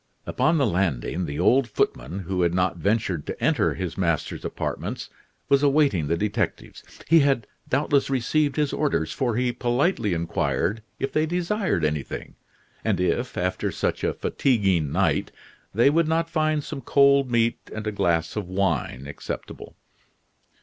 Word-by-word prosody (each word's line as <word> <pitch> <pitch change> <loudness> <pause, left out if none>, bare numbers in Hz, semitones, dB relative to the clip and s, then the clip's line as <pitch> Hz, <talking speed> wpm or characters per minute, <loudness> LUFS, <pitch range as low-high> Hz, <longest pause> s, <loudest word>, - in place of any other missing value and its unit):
Upon 160 +1 +1
the 140 - +3
landing 90 - -1
the 70 +1 -4
old 130 0 +4
footman, 80 - -1
who 95 0 -2
had 85 0 +2
not 90 -1 +1
ventured 95 -4 0
to - - -5
enter - - +2
his 90 -1 -4
master's 85 -4 -1
apartments, - - -4 0.4
was 140 0 +4
awaiting 140 - +3
the 85 +2 +1
detectives. 105 +2 -2 0.3
He 165 +1 +6
had 135 -6 +2 0.2
doubtless 140 0 +2
received 135 +2 +1
his 150 -2 0
orders, 85 - 0
for 120 -4 -1
he 125 +1 +1
politely 120 - 0
inquired 85 +4 -1 0.2
if 135 - -3
they 155 +1 +2
desired 175 - 0
anything, 75 -2 -3 0.5
and - - 0
if, 120 +7 -1
after 90 +1 -1
such - - -2
a - - 0
fatiguing 95 - +1
night, - - +1 0.4
they 120 +7 +4
would 165 +1 +2
not 165 +1 0
find 155 -2 +1
some 135 - -6
cold 140 0 +4
meat 115 -1 +2
and 110 0 -5
a 105 - -1
glass 85 -5 0
of 105 -4 -3
wine 85 -9 -1
acceptable. 75 - -7
110 Hz, 155 wpm, -24 LUFS, 90-140 Hz, 0.5 s, He